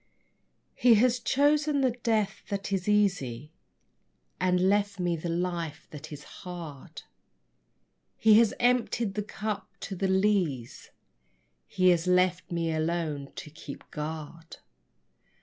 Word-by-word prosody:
_ - - -41 0.7
He 240 -2 +5
has 245 +3 +3
chosen 290 +3 +2
the 260 -2 +3
death 225 -4 -1
that 200 -1 -3
is 190 +1 -1
easy 160 - +1 0.9
And 180 0 +2
left 200 +1 +1
me 175 -1 0
the 165 +1 -5
life 170 -3 -3
that 150 0 -9
is 150 -1 -8 0.2
hard. 170 -7 -8 1.1
He 220 0 +6
has 230 -2 +3
emptied 240 -3 +1
the 210 - -2
cup 210 0 -4
to 195 - -5
the 195 +2 -1
lees, 190 - 0 0.8
he 185 0 +3
Has 175 0 +2
left 180 0 +2
me 165 -1 -1
alone 155 -3 -2
to 150 - -8
keep 145 -2 -10
guard. 160 +2 -7
185 Hz, 130 wpm, -28 LUFS, 165-210 Hz, 1.1 s, He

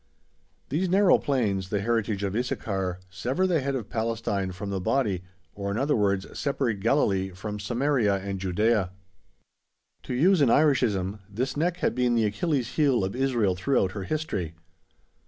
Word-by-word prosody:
These 175 +6 0
narrow 195 +1 +5
plains, 100 -9 0
the 105 - 0
heritage 110 -2 0
of 100 0 -2
Issachar, 95 -6 -2
sever 125 - -1
the 175 -4 +2
head 135 +1 -1
of 115 -6 -5
Palestine 110 -4 -1
from 100 +2 -6
the 95 -1 -2
body, 100 -4 0 0.3
or, 100 -1 -4
in 100 - -2
other 140 +4 +2
words, 100 -2 +1
separate 135 -7 -1
Galilee 100 -5 +2
from 105 +3 -6
Samaria 120 -1 +1
and 95 0 -4
Judæa. 95 +2 +1 1.1
To - - -5
use 175 +6 +4
an 135 - +5
Irishism, 110 -9 +2
this 125 +6 -2
neck 170 +4 0
had - - 0
been 125 -1 +1
the 115 -2 +3
"Achilles' 125 - -1
heel" 140 -9 +3
of 95 +3 -2
Israel 125 -7 +1
throughout 95 -1 +1
her 95 -2 -5
history. 100 - -3
110 Hz, 160 wpm, -26 LUFS, 100-135 Hz, 1.1 s, narrow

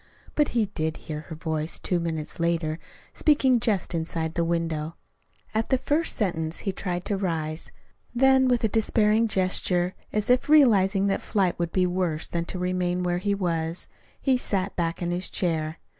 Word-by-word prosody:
But 295 -2 +2
he 225 - +4
did 160 -5 -3
hear 150 -1 -6
her 160 +1 -9
voice 160 0 -3
two 180 - -1
minutes 160 -2 -4
later, 165 -2 0 0.3
speaking 265 -5 +3
just 210 -6 0
inside 160 -1 -2
the 170 - 0
window. 165 -1 -2 0.6
At 220 +1 0
the 260 - +3
first 300 +5 0
sentence 165 -6 -1
he 195 - +1
tried 180 -2 -4
to 200 - 0
rise, 160 -4 -2 0.4
then 265 +1 +5
with 245 -2 +2
a - - +4
despairing 220 +1 +2
gesture 185 -2 +1 0.2
as 210 +1 0
if 250 +3 +2
realizing 200 -10 +5
that 195 - 0
flight 190 -5 0
would 170 -1 -1
be 185 -1 +2
worse 175 -3 -1
than 170 -1 -2
to 185 - -4
remain 180 0 -1
where 175 0 0
he 200 +2 0
was, 170 -3 -2 0.3
he 265 -2 +2
sat 195 -5 -1
back 170 0 -1
in 175 - -1
his 180 +1 -2
chair. 160 -3 -1
180 Hz, 175 wpm, -26 LUFS, 165-210 Hz, 0.6 s, then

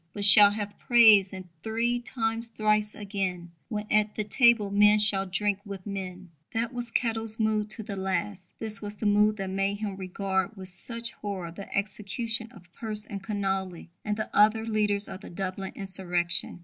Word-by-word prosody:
But 205 -1 +1
shall 200 0 +9
have 205 0 -5
praise, 220 -5 +6
and 185 -2 -9
three 230 +3 -1
times 230 -1 -2
thrice 215 -1 0
again, 190 -4 -4 0.2
When 210 -2 -3
at 210 0 +2
the 215 - -2
table 225 -1 +3
men 210 +1 +5
shall 205 -2 +5
drink 200 +1 -1
with 200 -3 -9
men. 185 -3 -7 0.2
That 230 +2 -1
was 240 -1 -4
Kettle's 225 -2 -1
mood 215 -1 0
to 220 +1 +2
the 200 -1 -6
last. 190 0 -3
This 215 -3 -2
was 205 0 -6
the 215 - -6
mood 210 +1 +3
that 195 -1 -4
made 195 +1 0
him 205 -2 -4
regard 190 +2 -3
with 190 -1 0
such 230 +5 -5
horror 190 -5 -6
the 195 +4 -10
execution 225 +3 -3
of 175 -7 -18
Pearse 215 -2 -6
and 200 -1 -7
Connolly, 190 -4 -3
and 210 -1 -2
the 215 - -5
other 215 +2 +4
leaders 210 -2 0
of 190 - -9
the - - -10
Dublin 190 +1 -5
insurrection. 180 -3 0
205 Hz, 180 wpm, -27 LUFS, 195-220 Hz, 0.2 s, shall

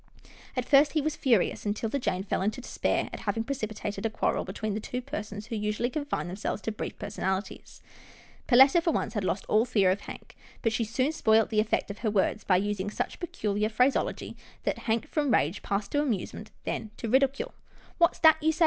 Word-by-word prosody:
At 250 - 0
first, 285 +2 +5
he 310 - +2
was 305 +1 -1
furious, 235 -9 +2
and 205 0 -1
'Tilda 225 +5 -2
Jane 190 -6 -1
fell 195 - -1
into 210 +5 -1
despair 255 - -1
at - - -5
having 225 - -1
precipitated 215 -5 -4
a 225 - +1
quarrel 220 - 0
between 215 -2 -4
the 210 - -2
two 245 +3 -4
persons 210 -6 -6
who 235 0 -5
usually 210 +3 -1
confined 285 - -2
themselves 190 +3 -3
to 225 - -1
brief 215 - -5
personalities. 190 -1 -4 0.6
Perletta, 270 +6 +7
for 335 - +1
once, 270 - -1
had 210 -4 -1
lost 185 +1 -1
all 215 +1 +4
fear 205 -7 +3
of 200 +2 -1
Hank, - - -10 0.3
but 225 - +2
she 230 +1 0
soon 255 +6 0
spoilt 225 -8 +3
the 215 - +2
effect 215 -1 0
of 200 - -9
her 225 - 0
words, 210 +1 +1
by 185 - +3
using 205 0 -1
such - - -4
peculiar 210 - -1
phraseology 250 +5 +1 0.3
that - - -1
Hank 230 +6 +1
from 295 -3 0
rage 170 -1 +2
passed 200 +1 -2
to 290 - +2
amusement, 215 -5 -3 0.2
and - - -2
then - - -21
to 230 - -4
ridicule. 275 - +2 0.2
" - - -26
What's 340 - +4
that 315 -1 +6
you 315 +1 +3
say? 320 - -9
220 Hz, 210 wpm, -28 LUFS, 210-270 Hz, 0.6 s, Perletta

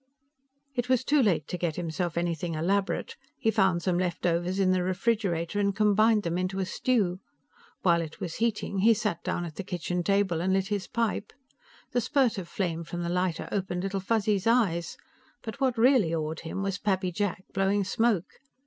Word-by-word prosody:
It 245 -1 -2
was 255 -1 +3
too 290 +2 +3
late 180 - +2
to 180 - -3
get 165 -3 -1
himself 175 0 -3
anything 170 -1 -1
elaborate; 200 - -1 0.2
he 225 - +1
found 190 -5 +2
some 180 -1 +1
leftovers 175 0 0
in 190 -1 +3
the 185 0 +2
refrigerator 185 -1 0
and 200 -1 +1
combined 215 +1 +4
them 170 +1 -1
into 185 +1 -2
a 190 - 0
stew. 190 -3 0 0.6
While 170 -2 +4
it 160 -1 -7
was 170 -3 -5
heating, 210 -3 -1
he 225 +3 +5
sat 210 -6 -2
down 175 - -2
at 160 -3 -9
the 195 - -3
kitchen 180 0 -2
table 195 -3 +1
and 190 +2 +1
lit 195 +1 0
his 205 -2 -2
pipe. 230 -3 -1 0.6
The 245 - +1
spurt 245 -3 +2
of 180 - -7
flame 170 -4 -2
from 175 +1 -5
the 170 - -2
lighter 180 -1 -1
opened 185 -2 -2
Little 195 0 -2
Fuzzy's 205 0 0
eyes, 200 -8 +2 0.5
but 230 +4 -7
what 255 -3 +2
really 225 -8 +4
awed 155 0 -3
him 170 +4 -4
was 195 -1 -2
Pappy 190 -3 0
Jack 190 0 -2
blowing 195 +1 +2
smoke. 210 -2 0
190 Hz, 185 wpm, -28 LUFS, 175-210 Hz, 0.6 s, he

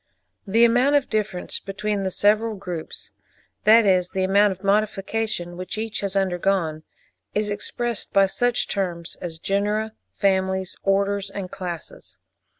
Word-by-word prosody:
The 225 +4 +5
amount 245 +5 +4
of 285 -2 +1
difference 210 -4 -2
between 205 +1 -3
the 190 - -1
several 215 +4 +2
groups—that 200 +4 -1
is 185 -2 +3
the 190 - -1
amount 200 +2 +4
of 190 +1 -8
modification 205 -2 0
which 185 +3 -5
each 220 0 -2
has 200 -1 -3
undergone—is 190 +2 -2
expressed 235 +1 -3
by 195 0 +5
such 245 +5 0
terms 175 -4 -3
as 170 -2 -5
genera, 210 +5 0 0.2
families, 190 -1 +1
orders, 200 0 +1
and 190 -3 -6
classes. 175 -3 -7
195 Hz, 130 wpm, -23 LUFS, 185-215 Hz, 0.2 s, The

